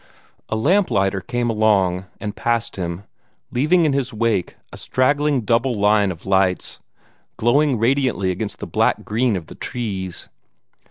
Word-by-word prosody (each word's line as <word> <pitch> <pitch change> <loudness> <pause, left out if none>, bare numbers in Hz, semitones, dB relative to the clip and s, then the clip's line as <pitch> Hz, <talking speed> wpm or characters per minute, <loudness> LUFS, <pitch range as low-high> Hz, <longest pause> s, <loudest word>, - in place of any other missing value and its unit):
A - - -1
lamp 180 - +2
lighter 95 -1 +1
came 120 +3 -2
along, 100 -4 +2
and 105 -1 -5
passed 120 -2 -1
him, 85 0 -4 0.5
leaving 160 +7 +3
in 150 - +2
his 135 -1 -1
wake 110 -5 -1 0.2
a - - -8
straggling 145 +1 +1
double 120 +3 +1
line 105 -1 +3
of 85 -2 -10
lights, 95 -1 +1 0.6
glowing 135 +3 +3
radiantly 115 -5 +1
against 100 +3 -4
the - - -6
black - - +1
green 115 +1 +1
of 90 -4 -4
the - - -11
trees. 95 -7 -5
110 Hz, 150 wpm, -21 LUFS, 95-130 Hz, 0.6 s, leaving